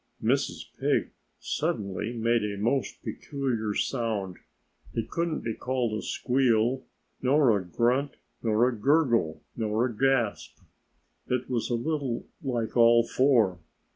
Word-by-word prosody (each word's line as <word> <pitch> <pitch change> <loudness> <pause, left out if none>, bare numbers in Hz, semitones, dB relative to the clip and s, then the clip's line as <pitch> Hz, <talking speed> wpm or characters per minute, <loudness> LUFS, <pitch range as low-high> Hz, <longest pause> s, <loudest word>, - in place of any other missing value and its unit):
Mrs. - - 0 0.2
Pig - - +1 0.3
suddenly 100 +2 -2
made 115 -1 +1
a 105 -1 -3
most 120 +7 -1
peculiar 120 -7 -3
sound. 110 -7 -1 0.6
It 115 - -3
couldn't 170 -2 -1
be 115 - -2
called 125 -3 -1
a 110 - -3
squeal, 125 -1 +1 0.3
nor 130 -3 +4
a 100 - -1
grunt, 125 - 0 0.3
nor 115 +1 +3
a 125 - -1
gurgle, 120 - +2
nor 110 +1 0
a 120 -3 -3
gasp. 135 0 0 0.7
It 125 +1 -2
was 120 -3 -1
a 120 - +1
little 135 -1 -2 0.2
like 120 -6 -2
all 115 0 +6
four. 120 -9 +3
120 Hz, 130 wpm, -28 LUFS, 110-130 Hz, 0.7 s, all